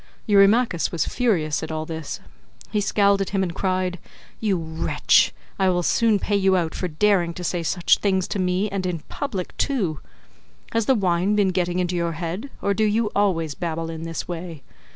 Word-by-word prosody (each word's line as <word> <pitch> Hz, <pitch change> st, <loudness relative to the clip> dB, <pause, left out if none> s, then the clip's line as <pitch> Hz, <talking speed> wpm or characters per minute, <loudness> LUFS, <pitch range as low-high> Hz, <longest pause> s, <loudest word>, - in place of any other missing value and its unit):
Eurymachus 205 Hz, -2 st, +4 dB
was 165 Hz, -4 st, 0 dB
furious 170 Hz, -12 st, 0 dB
at 160 Hz, -, -5 dB
all 155 Hz, 0 st, -3 dB
this. 160 Hz, -2 st, -5 dB, 0.5 s
He 210 Hz, -, +1 dB
scowled 200 Hz, 0 st, +3 dB
at 195 Hz, -, -1 dB
him 195 Hz, -1 st, 0 dB
and 175 Hz, -2 st, -3 dB
cried, 185 Hz, -1 st, -1 dB, 0.4 s
"You 205 Hz, -4 st, +1 dB
wretch, 160 Hz, -1 st, +2 dB, 0.3 s
I 190 Hz, -1 st, +3 dB
will 175 Hz, -1 st, +1 dB
soon 225 Hz, +3 st, +3 dB
pay 205 Hz, +1 st, -1 dB
you 190 Hz, -1 st, +3 dB
out 165 Hz, -3 st, -1 dB
for 180 Hz, -, -2 dB
daring 175 Hz, 0 st, +1 dB
to 180 Hz, -, -6 dB
say 175 Hz, 0 st, -1 dB
such 175 Hz, +2 st, +2 dB
things 190 Hz, -3 st, +1 dB
to 200 Hz, -, -2 dB
me, 185 Hz, +2 st, +1 dB
and 195 Hz, -2 st, -3 dB
in 170 Hz, -3 st, -3 dB
public 205 Hz, -11 st, -4 dB
too. 190 Hz, -, 0 dB, 0.7 s
Has 230 Hz, -2 st, 0 dB
the 265 Hz, -, +5 dB
wine 185 Hz, 0 st, +1 dB
been 205 Hz, -2 st, +3 dB
getting 180 Hz, -1 st, 0 dB
into 180 Hz, 0 st, 0 dB
your 170 Hz, -1 st, -1 dB
head 175 Hz, -, -4 dB
or 200 Hz, -, +2 dB
do 215 Hz, -, 0 dB
you 215 Hz, 0 st, +1 dB
always 165 Hz, -7 st, +1 dB
babble 165 Hz, +1 st, -3 dB
in 160 Hz, -1 st, -7 dB
this 165 Hz, 0 st, -5 dB
way? 170 Hz, -3 st, -6 dB
185 Hz, 195 wpm, -23 LUFS, 165-200 Hz, 0.7 s, the